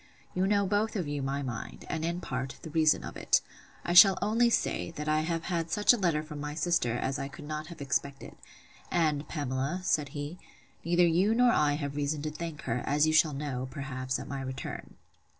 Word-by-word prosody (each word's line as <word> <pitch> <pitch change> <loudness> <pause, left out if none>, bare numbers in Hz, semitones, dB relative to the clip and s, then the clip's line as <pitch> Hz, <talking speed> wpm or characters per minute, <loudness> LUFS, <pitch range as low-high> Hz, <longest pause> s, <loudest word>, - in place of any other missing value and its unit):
You 185 +1 +1
know 200 0 +2
both 210 +3 0
of 180 -7 -2
you 145 -1 -3
my 135 +1 -2
mind, 120 -4 -6
and, 160 -1 -3
in 170 +2 -2
part, 130 -3 -4
the 160 - -7
reason 155 -1 +3
of - - -7
it. - - +3 0.5
I 175 - 0
shall 185 +2 +9
only 230 +3 +3
say, 230 - 0
that 150 -2 -6
I 155 0 +3
have 165 +1 -2
had 170 -2 -2
such 210 +6 +4
a - - 0
letter 170 -7 +1
from 150 -1 -8
my 150 0 -4
sister, 165 -8 +1
as 130 +3 -2
I 135 - -3
could 140 +2 -11
not 155 +1 -5
have 170 -3 -10
expected; 140 0 -3 0.5
and, 155 -4 +1
Pamela, 145 +3 -2
said 150 -5 +1
he, 145 +5 -6 0.4
neither 175 +1 +4
you 180 +6 +3
nor 245 0 +5
I 150 -7 +3
have 145 -1 -3
reason 145 0 -1
to 155 - -2
thank 155 -1 -6
her, 125 0 -1
as 145 +2 +3
you 155 - +1
shall 155 -1 +4
know, 135 -2 -3
perhaps 130 -2 -3
at - - -8
my 140 -1 -4
return. 130 0 -6
155 Hz, 215 wpm, -29 LUFS, 140-175 Hz, 0.5 s, shall